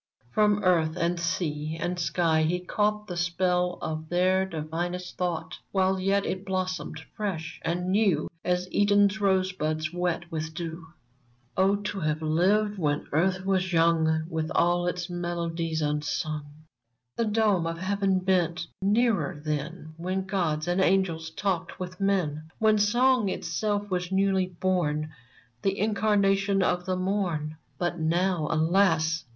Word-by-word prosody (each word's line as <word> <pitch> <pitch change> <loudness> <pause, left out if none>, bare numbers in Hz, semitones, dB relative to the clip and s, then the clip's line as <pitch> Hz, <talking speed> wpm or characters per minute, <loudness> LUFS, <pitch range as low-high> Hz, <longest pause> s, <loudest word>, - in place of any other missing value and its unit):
From 210 +2 +3
earth 170 -3 +2
and 170 0 0
sea 160 -3 -2
and 180 +1 -2
sky 165 -2 +2
he 170 +3 +1
caught 210 +3 0
The 180 -4 -6
spell 180 0 0
of 155 0 -4
their 185 +2 +2
divinest 175 +2 -4
thought, 165 -3 -3
While 190 -1 +2
yet 195 +1 +1
it 185 0 -3
blossomed 185 -1 -3 0.2
fresh 165 -6 -4
and 175 +2 -2
new 195 -7 +2 0.2
As 180 0 0
Eden's 205 +1 +3
rosebuds 185 -5 0
wet 175 -1 -2
with 160 0 -4
dew! 165 -1 -5 0.7
Oh! 195 +1 +3
to 205 0 -4
have 155 -2 0
lived 195 +6 +2
when 145 -3 0
earth 185 +4 +1
was 185 -1 +1
young, 165 -1 +3
With 160 -1 -2
all 175 +1 +3
its 175 0 -2
melodies 170 -2 -2
unsung! 150 0 -2 0.7
The 230 - 0
dome 210 -5 +2
of 165 0 -3
heaven 195 +1 +1
bent 175 -2 +1 0.2
nearer 205 -7 +1
then 155 +2 -4
When 185 +3 -2
gods 170 -5 -1
and 175 +2 +1
angels 180 -4 +1
talked 180 +1 -2
with 185 +1 -6
men 160 -6 0
— - - -38
When 215 -1 +3
Song 240 +1 +3
itself 205 +1 -2
was 180 0 -1
newly 190 -1 +2
born. 165 -4 -1 0.5
The 195 0 0
Incarnation 200 -2 +2
of 180 0 0
the 185 - +1
Morn! 180 -5 -1 0.2
But 175 +1 -2
now, 170 0 +1
alas 165 -1 +2
180 Hz, 140 wpm, -27 LUFS, 160-195 Hz, 0.7 s, From